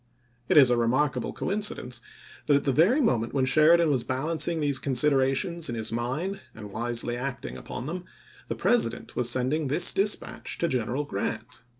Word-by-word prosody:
It - - +4
is 135 -4 +7
a 120 - +3
remarkable 130 +5 0
coincidence 185 - -3 0.5
that 145 - +5
at 140 - +1
the 135 - +1
p - - -5
•' - - +7
very 260 +7 +2
moment 120 - 0
when 130 -2 +2
Sheridan 155 +4 +4
was 130 -4 0
balancing 155 +5 0
these 145 -3 +1
considerations 140 +5 +1
in 120 - -3
his 110 0 -3
mind 135 +12 -3 0.2
and 105 -2 -9
wisely 120 +2 0
acting 125 - -5
upon 120 - -7
them, 175 +4 -5 0.4
the - - -3
President 240 - 0
was 120 -1 +1
sending 130 +5 +1
this 155 +6 +2
dispatch 205 +2 -2
to 170 - 0
General 130 0 -1
Grant. 115 0 -5
135 Hz, 180 wpm, -26 LUFS, 120-160 Hz, 0.5 s, is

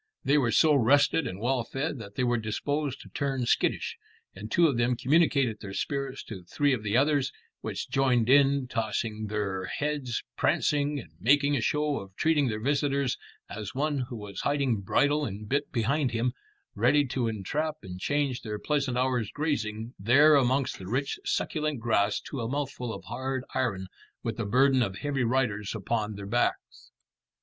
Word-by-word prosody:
They 145 +2 +4
were 120 -4 +1
so 155 +4 +5
rested 140 +5 +4
and 95 - -6
well 125 +2 0
fed 135 +3 -3
that 100 -2 -10
they 125 - 0
were 120 -1 +2
disposed 140 +6 -2
to - - -13
turn 135 -3 -2
skittish, - - 0 0.4
and 105 +3 -8
two 170 - +4
of 145 -5 +3
them 120 +1 +1
communicated 135 -5 +2
their 100 -2 -7
spirits 140 -2 -3
to 100 -5 -8
three 140 +10 +1
of 120 - -1
the 105 +2 +1
others, 140 -1 +2 0.3
which - - -4
joined 125 -4 +2
in, 140 0 +4
tossing 110 -1 -2
their 100 -3 -2
heads, 145 -4 -2
prancing, 145 0 +1
and 85 - -11
making 145 +4 +3
a 130 - 0
show 150 +4 0
of 95 -1 -11
treating 155 0 +2
their 110 -2 -2
visitor 140 +2 +1 0.4
as 105 +2 -7
one 145 +1 0
who 125 - -6
was 105 -3 -6
hiding 140 -5 +1
bridle 145 +9 +2
and 105 -3 -5
bit 140 +4 -1
behind 130 +3 +1
him, 120 +2 0 0.4
ready 135 +7 +3
to 130 -2 -1
entrap 150 - -2
and 90 -2 -8
change 140 +1 0
their 105 -2 -4
pleasant 140 +1 -1
hour's 125 -4 0
grazing 115 -7 -2
there 140 +10 +6
amongst 135 -1 +2
the 95 - -8
rich 135 +6 -1
succulent 150 -4 -1
grass 110 -3 +1
to 135 - -6
a 115 - -3
mouthful 135 -3 -3
of - - -7
hard 130 +1 -3
iron 105 -8 -1 0.4
with 115 -1 -3
the 115 - -2
burden 130 +4 +4
of 100 -5 -1
heavy 140 -3 -1
riders 115 -4 0
upon 110 -2 -2
their 100 0 -7
backs. 120 +5 -1
130 Hz, 175 wpm, -28 LUFS, 110-145 Hz, 0.4 s, there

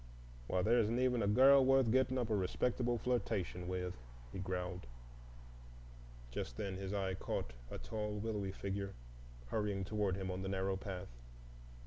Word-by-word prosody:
"Why, 90 +5 +1
there 120 +4 +5
isn't 115 +1 +2
even 125 -2 +2
a 100 - +2
girl 135 +6 +7
worth 135 -3 +5
getting 130 +1 +3
up 120 -3 -1
a - - +4
respectable 120 +5 +1
flirtation 105 -7 -1
with," 90 -1 -2 0.4
he - - -4
growled. 90 -3 -3 1.4
Just - - -4
then 95 -2 -2
his 95 0 -4
eye 95 -2 0
caught 95 -9 -3 0.2
a - - -5
tall, 105 - -3
willowy 105 -2 -2
figure 100 0 -4 0.5
hurrying 105 -3 0
toward 105 -2 0
him 95 -1 -3
on 90 +1 -3
the 95 - -3
narrow 95 0 0
path. 95 -4 -5
100 Hz, 155 wpm, -37 LUFS, 95-115 Hz, 1.4 s, girl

